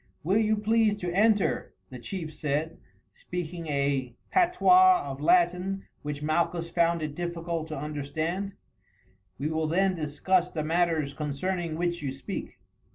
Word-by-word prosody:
"Will 190 Hz, +7 st, +3 dB
you 215 Hz, -1 st, +2 dB
please 215 Hz, 0 st, +3 dB
to 180 Hz, -4 st, -4 dB
enter," 210 Hz, 0 st, +2 dB, 0.2 s
the 125 Hz, -, -8 dB
chief 160 Hz, +3 st, -6 dB
said, 150 Hz, +2 st, -2 dB, 0.3 s
speaking 170 Hz, +2 st, -6 dB
a 140 Hz, -4 st, 0 dB, 0.2 s
patois 365 Hz, +1 st, +5 dB
of 135 Hz, 0 st, -6 dB
Latin 180 Hz, +4 st, +2 dB, 0.2 s
which 145 Hz, 0 st, -5 dB
Malchus 170 Hz, +2 st, 0 dB
found 170 Hz, -1 st, +2 dB
it 150 Hz, -1 st, -3 dB
difficult 170 Hz, -1 st, -3 dB
to 155 Hz, -, -5 dB
understand. 155 Hz, +7 st, -3 dB, 0.8 s
"We 145 Hz, +3 st, -2 dB
will 160 Hz, 0 st, 0 dB
then 190 Hz, +4 st, +2 dB
discuss 175 Hz, +3 st, +1 dB
the 155 Hz, -4 st, -3 dB
matters 160 Hz, -3 st, +1 dB
concerning 155 Hz, +4 st, -2 dB
which 175 Hz, -1 st, -1 dB
you 140 Hz, -3 st, -2 dB
speak." 135 Hz, -, -6 dB
170 Hz, 140 wpm, -28 LUFS, 150-185 Hz, 0.8 s, patois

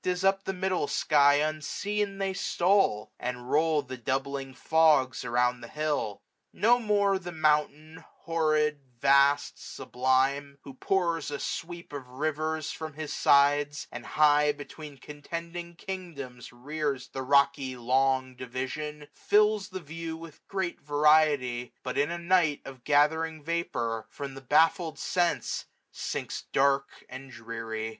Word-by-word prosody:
As 180 Hz, 0 st, -1 dB
up 195 Hz, 0 st, +2 dB
the -, -, -1 dB
middle 185 Hz, -4 st, -1 dB
sky 145 Hz, -2 st, +4 dB
unseen 195 Hz, +7 st, -1 dB
they 195 Hz, -1 st, -1 dB
stole; 175 Hz, -, +1 dB
And 125 Hz, 0 st, -5 dB
roll 155 Hz, -1 st, +3 dB
the 130 Hz, 0 st, -7 dB
doubling 135 Hz, +2 st, -2 dB
fogs 155 Hz, -4 st, +3 dB
around 125 Hz, +1 st, +1 dB
the 120 Hz, -, -8 dB
hilt. 150 Hz, -9 st, -2 dB, 0.3 s
No 235 Hz, +5 st, +3 dB
more 205 Hz, -3 st, +2 dB
the 175 Hz, -1 st, -7 dB
mountain, 155 Hz, 0 st, 0 dB, 0.2 s
horrid, 155 Hz, -3 st, +1 dB, 0.2 s
vast, 140 Hz, +2 st, +3 dB
sublime, 135 Hz, +2 st, 0 dB
Who 135 Hz, -, -10 dB
pours 170 Hz, +1 st, 0 dB
a 145 Hz, -, -3 dB
sweep 170 Hz, +1 st, -6 dB
of 140 Hz, -3 st, -6 dB
riversr 155 Hz, +3 st, -2 dB
from 160 Hz, -1 st, -6 dB
his 155 Hz, 0 st, -5 dB
sides, 145 Hz, +1 st, +3 dB
710 -, -, -12 dB
And -, -, -15 dB
high 150 Hz, -1 st, +5 dB
between 145 Hz, 0 st, -10 dB
contending 170 Hz, +5 st, -7 dB
kingdoms 160 Hz, -10 st, -7 dB
rears 140 Hz, +1 st, -3 dB
The 135 Hz, -, -5 dB
rocky 140 Hz, -1 st, +2 dB
long 130 Hz, +1 st, +1 dB
division, 140 Hz, +4 st, -5 dB
fills 210 Hz, -1 st, +2 dB
the 185 Hz, -1 st, -6 dB
view 165 Hz, +1 st, -6 dB
With 165 Hz, -2 st, -12 dB
great 190 Hz, -3 st, -3 dB
variety; 145 Hz, -5 st, +2 dB
but 130 Hz, +1 st, -2 dB
in 145 Hz, -, +2 dB
a 170 Hz, -, -3 dB
night 170 Hz, -4 st, +2 dB
Of 130 Hz, -2 st, -10 dB
gathering 155 Hz, +2 st, +2 dB
vapour, 120 Hz, -9 st, -2 dB
from 140 Hz, -2 st, -7 dB
the 135 Hz, -, -9 dB
baffled 160 Hz, +4 st, +2 dB
sense 175 Hz, +2 st, -1 dB, 0.2 s
Sinks -, -, -5 dB
dark 140 Hz, 0 st, +1 dB
and 130 Hz, +1 st, -9 dB
dreary. 115 Hz, -2 st, -5 dB
150 Hz, 135 wpm, -28 LUFS, 135-165 Hz, 0.3 s, high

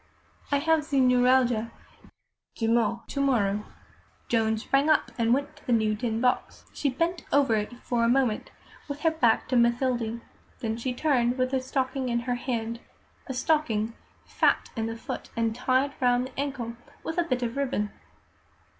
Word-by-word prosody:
"I 285 Hz, -, +4 dB
have 320 Hz, +1 st, +2 dB
ze 280 Hz, -2 st, 0 dB
neuralgia 250 Hz, -2 st, +4 dB, 0.9 s
demain 230 Hz, 0 st, +1 dB
to 280 Hz, -, -2 dB
morrow." 210 Hz, -7 st, +1 dB, 0.6 s
Joan 220 Hz, -1 st, +2 dB
sprang 275 Hz, +6 st, +1 dB
up 310 Hz, -, +3 dB
and 230 Hz, -1 st, +1 dB
went 280 Hz, +3 st, 0 dB
to -, -, -20 dB
the 245 Hz, -, +2 dB
new 220 Hz, -2 st, +2 dB
tin 225 Hz, 0 st, -2 dB
box. 250 Hz, +1 st, 0 dB
She 285 Hz, -, 0 dB
bent 335 Hz, +6 st, -1 dB
over 280 Hz, -4 st, +4 dB
it 215 Hz, +3 st, -2 dB
for 235 Hz, -2 st, 0 dB
a 230 Hz, -, +3 dB
moment, 245 Hz, -4 st, +1 dB, 0.4 s
with 290 Hz, 0 st, -6 dB
her 325 Hz, -, +3 dB
back 240 Hz, -8 st, +2 dB
to 255 Hz, -, +1 dB
Mathilde; 235 Hz, -1 st, +1 dB, 0.4 s
then 225 Hz, -3 st, -2 dB
she 245 Hz, +2 st, -3 dB
turned, 250 Hz, -4 st, +2 dB
with 255 Hz, +1 st, 0 dB
a 265 Hz, -, +2 dB
stocking 260 Hz, 0 st, -2 dB
in 235 Hz, 0 st, 0 dB
her 245 Hz, +1 st, -1 dB
hand 235 Hz, -2 st, -3 dB, 0.5 s
a 265 Hz, -, -3 dB
stocking 240 Hz, -7 st, +1 dB, 0.3 s
fat -, -, +1 dB
in 225 Hz, -1 st, -1 dB
the 225 Hz, 0 st, -5 dB
foot, 225 Hz, -, -6 dB
and 230 Hz, -1 st, +1 dB
tied 260 Hz, +3 st, +1 dB
round 245 Hz, 0 st, +3 dB
the 260 Hz, +1 st, -9 dB
ankle 265 Hz, -5 st, -3 dB, 0.3 s
with 325 Hz, +2 st, -2 dB
a -, -, +4 dB
bit 255 Hz, -6 st, -1 dB
of 235 Hz, +1 st, -2 dB
ribbon. 255 Hz, -7 st, -1 dB
250 Hz, 170 wpm, -27 LUFS, 230-270 Hz, 0.9 s, I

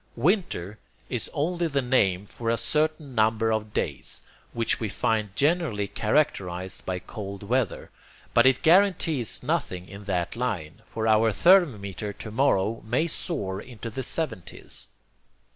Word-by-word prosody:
'Winter' 120 Hz, -, 0 dB, 0.3 s
is 125 Hz, -3 st, -1 dB
only 170 Hz, +3 st, 0 dB
the 140 Hz, -3 st, 0 dB
name 105 Hz, -8 st, +2 dB
for 115 Hz, +3 st, -4 dB
a 115 Hz, -, +2 dB
certain 150 Hz, +2 st, -1 dB
number 110 Hz, 0 st, +2 dB
of 110 Hz, -1 st, -1 dB
days -, -, -3 dB, 0.3 s
which 115 Hz, -1 st, 0 dB
we 110 Hz, -, -2 dB
find 105 Hz, -1 st, 0 dB
generally 145 Hz, -, +1 dB
characterized 95 Hz, -9 st, -1 dB
by 95 Hz, -1 st, -1 dB
cold 100 Hz, +1 st, -7 dB
weather, 120 Hz, -1 st, -1 dB, 0.4 s
but 120 Hz, +2 st, +6 dB
it 130 Hz, -1 st, +3 dB
guarantees 165 Hz, -, +3 dB
nothing 90 Hz, 0 st, -2 dB
in 100 Hz, 0 st, -10 dB
that 90 Hz, -2 st, -1 dB
line, 105 Hz, -7 st, -3 dB
for 110 Hz, 0 st, -2 dB
our 110 Hz, +1 st, +4 dB
thermometer 105 Hz, -, +3 dB
to 110 Hz, -, -8 dB
morrow 115 Hz, -3 st, +2 dB
may 120 Hz, +9 st, +1 dB
soar 105 Hz, -, -3 dB
into 115 Hz, -1 st, -8 dB
the 130 Hz, -, -4 dB
70's. 130 Hz, -, -4 dB
115 Hz, 140 wpm, -26 LUFS, 100-140 Hz, 0.4 s, but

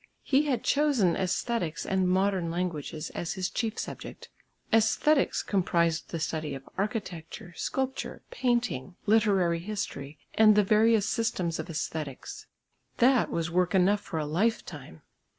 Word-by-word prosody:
He 285 Hz, +2 st, +2 dB
had 250 Hz, -5 st, 0 dB
chosen 280 Hz, -, +3 dB
æsthetics 190 Hz, -1 st, -1 dB
and 190 Hz, -1 st, +1 dB
modern 190 Hz, -2 st, +1 dB
languages 165 Hz, -3 st, -3 dB
as 170 Hz, -, -3 dB
his 185 Hz, -1 st, -3 dB
chief 225 Hz, -2 st, -2 dB
subject. -, -, -7 dB, 0.4 s
Æsthetics 225 Hz, +7 st, +3 dB
comprised 170 Hz, -4 st, +1 dB
the 165 Hz, -, -4 dB
study 155 Hz, -2 st, -3 dB
of 135 Hz, 0 st, -10 dB
Architecture, 190 Hz, -5 st, -4 dB
Sculpture, 265 Hz, 0 st, -3 dB
Painting, 240 Hz, -, -1 dB
Literary 200 Hz, -6 st, +3 dB
History 165 Hz, -7 st, -5 dB, 0.2 s
and 215 Hz, -1 st, +6 dB
the 210 Hz, -, +5 dB
various 215 Hz, +1 st, +4 dB
systems 180 Hz, -7 st, -1 dB
of -, -, -4 dB
æsthetics. 155 Hz, -4 st, -5 dB, 0.5 s
That 250 Hz, +1 st, +4 dB
was 165 Hz, 0 st, -2 dB
work 180 Hz, +2 st, +1 dB
enough 195 Hz, +3 st, +3 dB
for 165 Hz, -, -6 dB
a 155 Hz, -, -1 dB
lifetime. 155 Hz, -, -2 dB
190 Hz, 135 wpm, -28 LUFS, 165-225 Hz, 0.5 s, and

